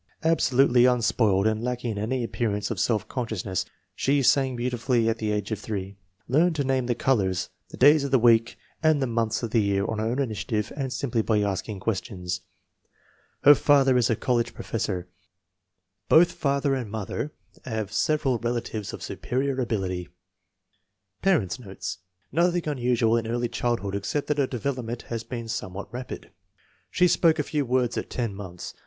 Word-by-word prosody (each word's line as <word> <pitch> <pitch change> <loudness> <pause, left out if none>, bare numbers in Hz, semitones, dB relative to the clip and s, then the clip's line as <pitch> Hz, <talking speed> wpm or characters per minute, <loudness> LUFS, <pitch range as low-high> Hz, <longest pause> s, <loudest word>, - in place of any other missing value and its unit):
Absolutely 135 -6 +4
unspoiled 110 -5 +3
and 110 +1 +1
lacking 125 -1 -2
in 105 - -5
any 120 +4 -1
appearance 105 -3 -2
of - - -3
self 110 -3 +1
consciousness. 110 -7 -3 0.3
She 140 0 +1
sang 130 0 +3
beauti 120 0 -2
fully 120 -1 +2
at 115 0 0
the 110 -1 -1
age 105 0 -2
of 110 - -2
3. 100 -2 -5 0.3
Learned 160 +6 +3
to 145 - 0
name 130 -2 0
the 120 - +1
colors, 100 -8 +1 0.2
the - - -10
days 145 +2 +6
of 140 - -2
the 135 - +4
week 115 -1 +4 0.2
and 155 -2 +4
the 135 - +1
months 115 -1 -1
of 115 - -3
the 115 - +3
year 100 -1 +1
on 110 - -2
her 110 - 0
own 120 +3 -1
initiative 110 -4 -2
and 135 -3 -3
simply 120 -4 -1
by 110 -1 +1
asking 100 0 -3
questions. 95 -4 -3 1.0
Her 145 - +10
father 140 -2 +4
is 120 -2 +3
a 115 - +3
college 120 +1 0
professor. 95 -5 -3 1.0
Both 170 +2 +6
father 140 0 0
and 125 -5 -3
mother 110 +7 -4 0.3
have 110 -4 -3
several 135 +1 +1
relatives 115 -3 -3
of - - -7
superior 130 +1 -2
ability. 95 -7 -2 1.1
Parents 130 - +1
9 120 - -12
notes. 95 -1 -5 0.3
Nothing 175 +2 +1
unusual 120 -5 +2
in 115 -1 -2
early 120 +1 -1
child 120 0 -1
hood 100 -1 -4
except 100 +9 -2
that 150 -1 +1
her 135 - +2
development 125 -1 -3
has 115 -1 -5
been 115 -2 -6
some 105 -4 -4
what 100 +3 -7
rapid. 125 -5 -7 0.6
She 180 - +3
spoke 165 -2 +3
a - - +1
few 145 -4 -2
words 125 -1 +1
at - - -7
ten 115 -5 -2
months. 95 -3 -8
120 Hz, 180 wpm, -26 LUFS, 105-130 Hz, 1.1 s, Her